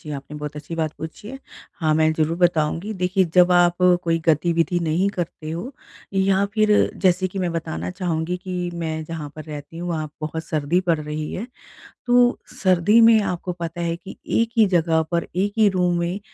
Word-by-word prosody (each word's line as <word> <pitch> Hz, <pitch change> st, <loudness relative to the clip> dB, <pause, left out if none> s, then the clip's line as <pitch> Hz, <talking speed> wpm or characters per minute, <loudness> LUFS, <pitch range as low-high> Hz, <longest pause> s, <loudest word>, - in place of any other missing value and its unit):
जी 150 Hz, -, -9 dB
आपने 140 Hz, +2 st, -9 dB
बहुत 150 Hz, 0 st, -6 dB
अच्छी 150 Hz, +3 st, -7 dB
बात 160 Hz, -2 st, -1 dB
पूछी 160 Hz, +6 st, -8 dB
है। 265 Hz, +3 st, -7 dB, 0.4 s
हाँ, 155 Hz, -2 st, +2 dB
मैं 155 Hz, 0 st, +3 dB
ज़रूर 160 Hz, +1 st, 0 dB
बताऊँगी। 170 Hz, +3 st, +1 dB
देखिए 185 Hz, +1 st, +1 dB
जब 180 Hz, 0 st, +6 dB
आप 175 Hz, -1 st, +4 dB, 0.3 s
कोई 165 Hz, -1 st, +1 dB
गतिविधि 165 Hz, +2 st, +2 dB
नहीं 170 Hz, +4 st, +1 dB
करते 165 Hz, -3 st, -4 dB
हो 175 Hz, -, -5 dB, 0.4 s
या 195 Hz, 0 st, +3 dB
फिर 215 Hz, -1 st, +3 dB, 0.4 s
जैसे 185 Hz, 0 st, +3 dB
कि 195 Hz, -, -6 dB
मैं 180 Hz, -2 st, 0 dB
बताना 90 Hz, -, -4 dB
चाहूँगी 170 Hz, -, -2 dB
कि 180 Hz, -1 st, -3 dB
मैं 160 Hz, -2 st, -3 dB
जहाँ 155 Hz, -2 st, -6 dB
पर 155 Hz, -, -7 dB
रहती 150 Hz, +1 st, -8 dB
हूँ 175 Hz, +1 st, -4 dB
वहाँ 155 Hz, -2 st, -2 dB
बहुत 160 Hz, +1 st, -4 dB
सर्दी 155 Hz, +2 st, 0 dB
पड़ 165 Hz, -, +2 dB
रही 150 Hz, 0 st, -5 dB
है। 220 Hz, -, -4 dB, 0.6 s
तो 245 Hz, 0 st, +4 dB, 0.3 s
सर्दी 185 Hz, +4 st, +4 dB
में 225 Hz, -1 st, +7 dB
आपको 180 Hz, -2 st, -3 dB
पता 170 Hz, +1 st, -4 dB
है 170 Hz, 0 st, -1 dB
कि 190 Hz, +3 st, -11 dB, 0.2 s
एक 230 Hz, 0 st, +2 dB
ही 220 Hz, -, +7 dB
जगह 160 Hz, -1 st, +3 dB
पर 170 Hz, -1 st, 0 dB
एक 200 Hz, +3 st, 0 dB
ही 215 Hz, -1 st, +5 dB
रूम 180 Hz, -2 st, +1 dB
में 175 Hz, +3 st, -2 dB
170 Hz, 195 wpm, -22 LUFS, 160-185 Hz, 0.6 s, में